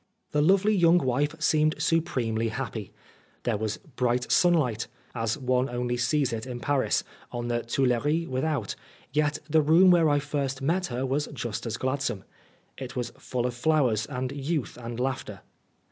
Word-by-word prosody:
The 150 - +2
lovely 195 +6 +4
young 175 -3 +5
wife 145 +2 0
seemed 155 0 +3
supremely 120 -9 0
happy. 110 -3 -4 0.5
There 120 - +1
was 110 -1 -2
bright 125 -3 -1
sunlight, 145 -11 +3 0.3
as 115 0 -1
one 130 -1 +1
only 120 0 -1
sees 125 +1 +1
it 115 +2 -4
in 125 -1 -5
Paris, 140 +2 +1 0.3
on 120 0 -4
the 120 0 0
Tuileries 135 +7 +1
with 130 0 -2
out, 155 -3 -1 0.4
yet 150 0 +1
the 155 +1 +4
room 165 +5 +6
where 170 -3 +5
I 145 - +3
first 140 -2 -2
met 170 +7 0
her 125 +1 -2
was 140 +3 0
just 115 -1 -4
as 115 0 -3
gladsome. 130 -6 -2 0.6
It 130 -2 -7
was 125 -2 -2
full 125 -1 -2
of 125 - -1
flowers 120 -5 +2
and 130 0 -3
youth 145 0 -2
and 120 -1 -7
laughter. 130 +1 -3
130 Hz, 165 wpm, -27 LUFS, 120-150 Hz, 0.6 s, room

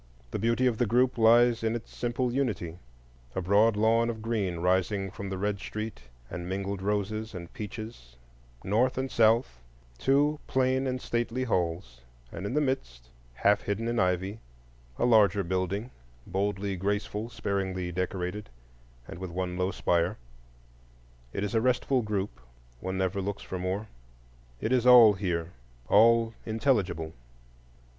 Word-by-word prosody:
The - - -2
beauty 115 +4 +2
of 120 -3 +1
the 120 - +2
group 125 +3 +3
lies 115 +1 +5
in 115 +1 +1
its 120 - -8
simple 120 0 -1
unity:—a 60 - -5
broad 105 +4 +4
lawn 115 +2 +3
of 110 -2 -5
green 105 -6 -1
rising 95 +3 +1
from 100 +1 -6
the 95 - -3
red 100 +1 -1
street 105 - -6 0.2
and 90 +4 -6
mingled 100 0 -3
roses 105 +2 -2
and 85 -1 -8
peaches; 110 - -8 0.5
north 120 +7 +1
and 130 0 -2
south, 110 - +3 0.4
two 145 +3 +2
plain 130 0 +1
and 130 0 -2
stately 120 +1 -2
halls; 85 - -2 0.3
and 100 - -5
in 125 - -3
the 150 - +3
midst, 65 - -3 0.2
half 100 +10 +3
hidden 105 +3 -2
in 120 0 0
ivy, 95 +3 0 0.6
a - - +1
larger 105 -4 +5
building, 95 +6 -2 0.3
boldly 100 +1 -1
graceful, 105 +3 -2
sparingly 95 -5 -2
decorated, 90 +3 -3 0.6
and 85 - -8
with 95 -1 -5
one 90 +1 -3
low 90 +1 0
spire. 85 -2 0 1.1
It 100 - -3
is 105 - -2
a 115 - +3
restful 125 +1 +2
group, 100 - -3 0.4
—one 95 +6 -3
never 95 +1 0
looks 100 +1 -4
for 95 - -5
more; 95 +4 -2 0.8
it 110 - -1
is 125 -1 +3
all 120 -4 +9
here, 90 -4 -2 0.4
all 115 +1 +5
intelligible. 100 - 0
105 Hz, 145 wpm, -28 LUFS, 90-115 Hz, 1.1 s, all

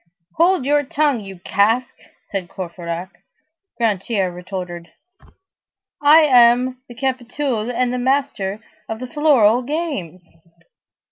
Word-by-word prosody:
"Hold 340 -3 +3
your 290 +1 +3
tongue, 290 -2 0
you 195 -2 -9
cask!" 225 +7 +1 0.4
said 190 -4 -4
Courfeyrac. 175 0 -7 0.6
Grantaire 205 -3 0
retorted:— 180 -1 -7 1.1
"I 300 +3 +7
am 250 -2 +4
the 240 - -10
capitoul52 250 -2 -2
and 250 0 0
the 250 - -2
master 245 -6 -1 0.3
of 225 - -4
the 255 - -5
floral 255 -5 +3
games!" 255 - -4
240 Hz, 110 wpm, -20 LUFS, 195-275 Hz, 1.1 s, I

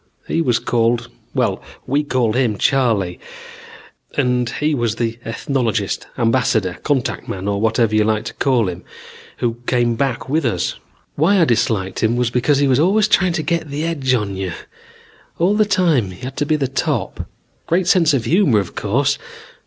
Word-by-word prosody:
He 165 - 0
was 125 -7 +2
called 120 0 0 0.3
well, - - 0 0.2
we 140 +3 +1
called 125 -6 0
him 120 -5 +1
Charley, 110 -9 +1 1.0
and 125 -1 +1
he 150 +4 -1
was 120 -5 0
the 115 0 -2
ethnologist, 115 0 -2
ambassador, 115 -6 +1
contact 135 -4 -1
man, 95 +1 -5
or 100 0 -1
whatever 115 0 +2
you 110 0 +4
like 110 0 0
to - - -5
call 125 -6 +1
him, 90 -1 -5 0.5
who 115 -1 -1
came 120 -2 +2
back 130 +1 -2
with 155 +4 0
us. 110 -9 0 0.4
Why 185 +7 +3
I 170 - +5
disliked 110 -6 0
him 110 +1 +2
was 120 -1 0
because 125 +4 +2
he 140 0 +2
was 130 0 +3
always 205 +6 +3
trying 185 -4 +3
to 160 -2 -2
get 165 0 -1
the 145 +3 -3
edge 140 -6 0
on 105 -4 -2
you. 95 -2 -3 0.8
All 180 +4 +2
the 215 0 +3
time 170 - +2
he 95 - -12
had 130 +1 -6
to 145 - -1
be 155 0 +2
top. 135 -2 -2 0.4
Great 180 +2 +1
sense 175 -4 +4
of 135 -5 0
humor, 170 - +3
of 95 -4 -2
course. 135 +7 0
125 Hz, 175 wpm, -19 LUFS, 115-150 Hz, 1.0 s, I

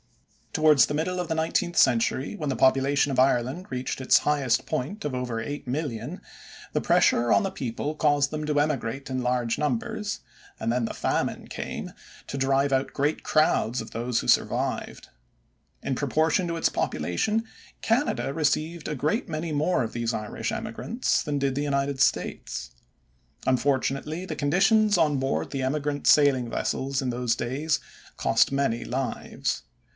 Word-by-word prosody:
Towards 155 -5 +5
the 145 - -2
middle 180 +4 -1
of 180 - -3
the 160 - 0
nineteenth 170 +2 0
century, 130 - +3
when 150 -8 -3
the 135 - -1
population 135 +2 +3
of 130 - 0
Ireland 130 +6 +2
reached 130 +1 -3
its 130 - +5
highest 140 -5 +2
point 165 +9 -3
of 145 - -2
over 125 -2 -3
8,000,000, 140 +2 -4 0.5
the - - +1
pressure 120 0 +3
on - - +5
the 195 - -2
people 135 +4 -4
caused 145 -2 +2
them 155 0 -3
to 150 -1 +2
emigrate 135 -2 -1
in 130 0 -1
large 125 -2 0
numbers, 150 - -2 0.4
and - - -2
then 120 -1 0
the - - -5
famine - - -1
came - - -6 0.3
to 140 - -4
drive 135 +1 +2
out 135 +1 0
great 145 +3 0
crowds 140 -6 +2
of 110 - -7
those 120 +1 -1
who - - -5
survived. - - 0 0.8
In 135 - -1
proportion 155 +6 +1
to 170 0 -2
its - - +3
population 215 - -1 0.4
Canada 230 - 0
received 160 +2 0
a 150 - -2
great 155 - -1
many 155 +1 -3
more 150 -1 +1
of 115 - -5
these 120 0 -1
Irish 105 -1 -3
emigrants 235 - -1
than 145 -1 -2
did 140 -1 0
the 145 - -1
United 140 -2 0
States. - - -1 0.7
Unfortunately 140 +5 0
the - - -5
conditions 205 +8 +3
on 150 -4 +3
board 135 0 -1
the 135 - -2
emigrant 145 +2 -1
sailing 135 -5 +5
vessels 135 +3 -1
in 130 - -2
those 120 -1 0
days 140 +5 -1 0.4
cost - - +3
many 135 -4 0
lives. 130 +1 -3
140 Hz, 160 wpm, -26 LUFS, 125-155 Hz, 0.8 s, Towards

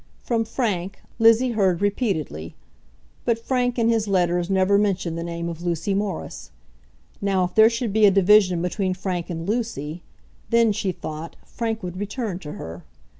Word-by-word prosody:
From 230 -2 0
Frank, 195 -6 -2 0.2
Lizzie 230 +2 +5
heard 190 -6 +2
repeatedly, 195 - -2 0.7
but 235 -1 +1
Frank 245 +1 -1
in 230 -1 +2
his 225 -2 +1
letters 175 -2 +1
never 195 +1 +3
mentioned 190 -5 0
the 165 - -4
name 170 0 -4
of 170 -1 -6
Lucy 175 +2 -1
Morris. 200 0 -4 0.7
Now, 195 -2 +1
if 180 - -3
there 220 0 +7
should 230 -2 -2
be 215 -1 +6
a - - +8
division 190 -2 +4
between 185 +1 -1
Frank 180 -2 -3
and 165 0 -5
Lucy, 190 - -3 0.5
then, 230 -1 +4
she 205 -2 -1
thought, 155 -1 -7
Frank 225 -2 -3
would 180 0 -5
return 205 -2 -3
to 150 -5 -8
her. 80 +2 -8
195 Hz, 165 wpm, -23 LUFS, 175-225 Hz, 0.7 s, a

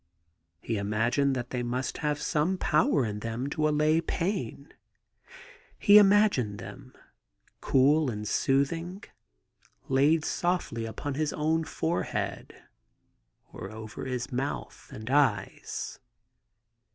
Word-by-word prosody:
He 115 - -2
imagined 115 +7 +1
that 120 -1 -4
they 125 - -2
must 125 +1 -3
have 150 -1 -1
some 155 +6 0
power 150 -5 +2
in 105 -1 -4
them 115 +5 -4
to 155 +1 +1
allay 155 +2 +3
pain; 165 - -3 1.0
he 205 +1 +8
imagined 200 - +4
them, 125 +7 -11 0.7
cool 145 +2 +3
and 105 -2 -4
soothing, 165 - 0 0.9
laid 145 +4 +3
softly 175 -11 -1
upon 140 +6 -4
his 150 +2 -1
own 160 +2 0
forehead, 165 +3 -3 0.9
or - - -7
over 110 +2 -8
his 125 -2 -3
mouth 135 +3 -4
and 110 -5 -9
eyes. 130 -8 0
140 Hz, 110 wpm, -28 LUFS, 120-155 Hz, 1.0 s, he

